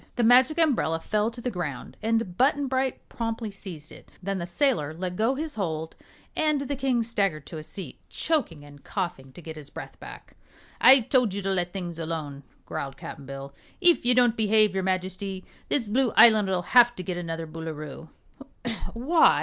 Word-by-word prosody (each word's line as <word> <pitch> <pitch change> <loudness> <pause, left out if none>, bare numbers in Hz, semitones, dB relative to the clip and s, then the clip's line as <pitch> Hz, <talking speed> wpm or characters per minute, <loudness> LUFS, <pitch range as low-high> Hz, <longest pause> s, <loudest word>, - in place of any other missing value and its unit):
The 240 - +1
Magic 255 +6 +5
Umbrella 260 - +2
fell 210 +5 0
to 235 +1 -9
the 250 - -2
ground 155 - -5
and 225 -4 0
Button 280 +5 +3
Bright 260 0 -1
promptly 225 -2 -4
seized 175 -6 -10
it. - - -14
Then 195 0 -2
the 170 - -4
sailor 175 - 0
let 180 +1 -4
go 225 +7 +1
his 305 +2 -4
hold 160 -6 -3 0.4
and 305 -2 +1
the 280 0 -2
King 260 -3 +1
staggered 195 -10 -1
to 160 - -7
a - - -8
seat, 190 +4 -9
choking 255 - -1
and 145 -1 -15
coughing 175 -9 -4
to 175 - -12
get 160 0 -7
his 145 -2 -10
breath - - -9
back. - - -11 0.5
"I 265 0 +9
told 235 -4 +2
you 200 - -3
to 195 - 0
let 180 -2 0
things 175 -3 -5
alone," 155 -4 -4 0.2
growled 135 -1 -5
Cap'n 140 -1 -9
Bill. 135 0 -7 0.3
"If 350 -2 +5
you 245 0 +4
don't 245 -2 +4
behave, 215 -2 +3
your 190 - 0
Majesty, 185 +1 -3 0.2
this 245 -6 +1
Blue 245 +3 +2
Island'll 205 -6 +6
have 240 -1 +6
to 185 - -6
get 180 0 -3
another 165 -1 -4
Boolooroo." 155 -1 -7 0.9
"Why?" 305 +8 +4
195 Hz, 185 wpm, -26 LUFS, 165-245 Hz, 0.9 s, I